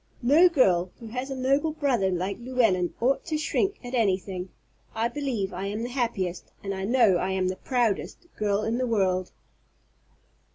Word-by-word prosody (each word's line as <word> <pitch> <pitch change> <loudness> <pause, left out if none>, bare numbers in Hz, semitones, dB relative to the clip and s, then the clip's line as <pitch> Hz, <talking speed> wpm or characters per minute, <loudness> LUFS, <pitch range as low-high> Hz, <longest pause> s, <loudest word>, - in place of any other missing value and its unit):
No 310 +9 +6
girl 185 - +3
who 230 - -9
has 250 +4 -4
a 270 - -3
noble 275 +4 +1
brother 255 -10 +1
like 185 +3 -2
Llewellyn 230 -8 +1
ought 255 +4 +1
to 315 -3 -1
shrink 390 +6 0
at 245 - -7
anything. 190 -5 0 0.5
I 225 +1 +1
believe 240 -7 -3
I 190 +2 -4
am 210 +3 -3
the 240 - -3
happiest, 230 -8 -2
and 195 -1 -3
I 190 0 -3
know 225 -5 +4
I 185 +2 -1
am 185 -1 0
the 185 - -2
proudest, 240 - -1
girl 205 0 0
in 230 +3 -1
the 255 - 0
world." 185 -5 +1
225 Hz, 175 wpm, -26 LUFS, 190-255 Hz, 0.5 s, No